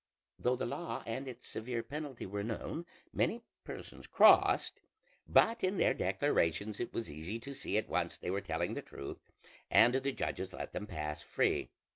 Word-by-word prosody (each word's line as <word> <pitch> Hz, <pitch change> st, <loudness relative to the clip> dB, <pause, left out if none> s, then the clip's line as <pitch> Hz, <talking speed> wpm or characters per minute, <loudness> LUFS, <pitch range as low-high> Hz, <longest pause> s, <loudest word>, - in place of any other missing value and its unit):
Though 125 Hz, +1 st, +2 dB
the -, -, -2 dB
law 170 Hz, +8 st, -4 dB
and 125 Hz, +4 st, -3 dB
its 125 Hz, -, -8 dB
severe 115 Hz, +1 st, -3 dB
penalty 145 Hz, -4 st, -5 dB
were 100 Hz, +1 st, -3 dB
known, 140 Hz, +9 st, -4 dB, 0.3 s
many 230 Hz, +1 st, +1 dB, 0.2 s
persons -, -, -8 dB
crossed; -, -, +6 dB, 0.5 s
but 230 Hz, +1 st, +4 dB
in 190 Hz, +1 st, +1 dB
their -, -, +4 dB
declarations 100 Hz, -, +1 dB
it 120 Hz, -, -2 dB
was 115 Hz, -, -3 dB
easy 80 Hz, +8 st, -5 dB
to 140 Hz, +4 st, -8 dB
see 130 Hz, -6 st, -2 dB
at 110 Hz, -, 0 dB
once -, -, -1 dB
they 90 Hz, -, -3 dB
were 100 Hz, +1 st, 0 dB
telling 85 Hz, -1 st, -1 dB
the -, -, -3 dB
truth, 70 Hz, -, -8 dB, 0.5 s
and 120 Hz, +2 st, +7 dB
the 135 Hz, +1 st, +1 dB
judges 95 Hz, -7 st, -3 dB
let -, -, -6 dB
them 105 Hz, -, -4 dB
pass 75 Hz, -2 st, -4 dB
free. -, -, +1 dB
115 Hz, 175 wpm, -34 LUFS, 95-135 Hz, 0.5 s, and